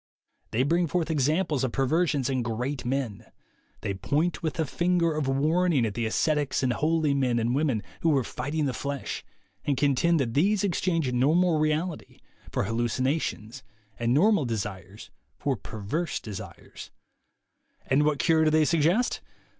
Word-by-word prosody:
They 120 +4 +1
bring 170 +4 +2
forth 165 +1 -1
examples 150 0 +1
of 130 - -1
perversions 145 0 +1
in 130 -2 0
great 120 +4 -3
men. 125 -5 -3 0.5
They 100 - -2
point 145 - -1
with 160 0 -3
a 160 - +2
finger 170 +2 +1
of 150 -3 -1
warning 150 +1 +2
at 105 - -2
the 115 +1 -1
ascetics 145 +4 0
and 125 -2 +2
holy 155 +1 +1
men 130 -4 +1
and 115 +1 0
women 135 -6 0 0.2
who 165 - +1
were 140 -4 +3
fighting 150 +5 -3
the 135 - -1
flesh, 140 +1 -4 0.4
and 140 -2 0
contend 145 +4 +2
that 120 -4 -1
these 195 - +2
exchanged 165 -7 0
normal 155 +6 +3
reality 155 +2 -2 0.3
for - - 0
hallucinations, 120 +2 -2 0.4
and 115 0 0
normal 170 - +4
desires 105 -3 -5 0.3
for 140 -2 -1
perverse 110 - -4
desires. 100 -4 -9 1.0
And 135 +2 +3
what 150 -1 +2
cure 160 +1 +3
do - - +5
they 155 0 +3
suggest? 170 +10 +2
145 Hz, 155 wpm, -27 LUFS, 125-160 Hz, 1.0 s, do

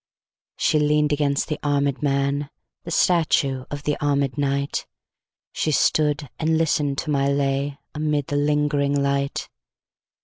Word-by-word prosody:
She 155 - +2
lean'd 150 0 +2
against 140 -1 0
the 150 -2 -3
armèd 140 -1 0
man, 140 0 0 0.4
The - - -6
statue 150 -7 +2
of 145 0 -6
the 150 0 0
armèd 140 -2 +1
knight; 140 -1 -1 0.7
She - - -1
stood 150 -1 +2
and 160 0 +2
listen'd 145 -3 +1
to 155 - -2
my 140 -1 +2
lay, 140 0 0 0.2
Amid 150 -2 -1
the 145 - -4
lingering 145 -1 +1
light. 140 0 -1
145 Hz, 135 wpm, -23 LUFS, 140-150 Hz, 0.7 s, She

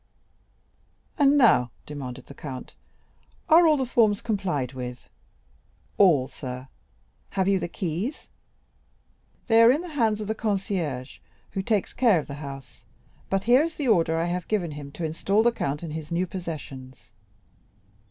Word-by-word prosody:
"And 285 0 +5
now," 220 - +5 0.2
demanded 135 -4 -7
the - - -12
count, 135 -3 -8 0.8
"are 335 +1 +7
all 305 -1 +4
the 265 - 0
forms 220 -4 +3
complied 175 - -2
with?" 125 -1 -7 0.9
"All, 155 -10 +5
sir." 130 -1 -8 0.7
"Have 190 -1 +2
you 195 -1 +3
the 170 - -3
keys?" 185 - -4 1.2
"They 225 -1 +5
are 230 - +8
in 290 +5 +1
the 355 - -8
hands 225 -8 +1
of 210 - -5
the 220 - 0
concierge, 190 - -3 0.3
who 195 - -2
takes 210 -1 0
care 235 -7 +4
of 155 - -2
the 140 - -8
house, 135 -3 -9 0.5
but 195 0 0
here 245 +4 +5
is 325 0 -2
the 280 -5 -1
order 165 -6 +3
I 165 - 0
have 175 0 -3
given 185 -7 -1
him 145 -1 -8
to 170 - -4
install 195 +7 +1
the 240 - +4
count 145 -8 -3
in 165 - -5
his 155 0 -6
new 175 +2 +1
possessions." 140 -9 -8
180 Hz, 160 wpm, -26 LUFS, 145-225 Hz, 1.2 s, are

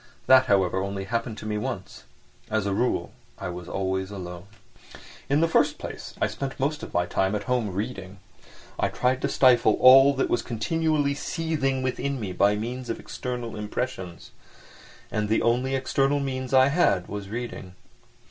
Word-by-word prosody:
That, 130 0 +6
however, 95 -3 +2
only 100 0 -3
happened 115 +2 -3
to - - -8
me 105 -1 -2
once. - - -6 0.4
As 110 -1 0
a 100 - 0
rule, 125 +5 0 0.3
I - - -5
was 90 0 -7
always 95 0 -2
alone. 90 -2 -8 0.8
In 145 +3 +3
the 165 - +4
first 165 - +2
place - - -8
I - - +2
spent 135 0 -5
most 145 +3 -1
of - - -8
my 90 0 +1
time 95 +2 0
at 105 - -3
home, 125 -3 0
reading. 95 -1 -5 0.6
I - - +2
tried 125 +1 0
to - - 0
stifle 120 -4 +4
all 135 +2 +8
that 135 - +1
was 120 - 0
continually 150 +4 0
seething 145 -4 -2
within 135 +1 -2
me 100 -5 -4
by 100 +3 +3
means 120 +4 -5
of 115 - -3
external 125 -2 -5
impressions. 105 -5 -5 0.8
And 105 -1 -1
the 110 - +2
only 125 +3 +1
external 135 +2 +1
means 130 -2 -3
I 130 0 +6
had 100 - +2
was 100 -1 -6
reading. 110 -5 -6
120 Hz, 170 wpm, -25 LUFS, 100-130 Hz, 0.8 s, all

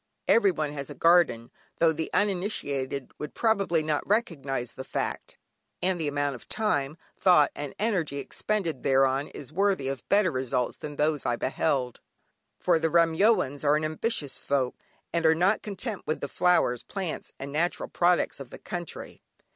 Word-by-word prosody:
Everyone 175 -9 +3
has 140 -2 -5
a - - -8
garden, 165 -9 +3 0.3
though 165 -1 +4
the 160 +1 -3
uninitiated 145 -10 -1
would 150 - -6
probably 195 -8 +2
not 155 -1 0
recognise 140 - -1
the 130 - -7
fact, - - -4 0.4
and 180 -2 0
the 155 - -1
amount 145 0 0
of 125 - -12
time, 150 -9 0 0.2
thought, 175 -6 +5
and 145 -2 -6
energy 185 -10 0
expended 170 0 -2
thereon 135 +1 +2
is 145 +2 -9
worthy 195 -6 +1
of 135 -2 -3
better 200 -3 +4
results 130 -2 -1
than 150 -1 -7
those 150 -1 +1
I 120 - +1
beheld. 130 -1 -1 0.6
For 175 -3 +2
the 165 0 +1
"Remyoans" 165 - +3
are 145 0 +4
ambitious 155 - -2
folk, 135 -3 0 0.4
and 170 -1 +1
are 160 0 +5
not 185 +6 +2
content 210 +1 -5
with 155 - -1
the 140 - -3
flowers, 140 -8 +2
plants 190 -5 -5
and 140 +1 -6
natural 165 +4 -1
products 175 -3 +1
of 135 -3 -8
the - - -9
country. 175 -2 -7
155 Hz, 160 wpm, -27 LUFS, 140-180 Hz, 0.6 s, thought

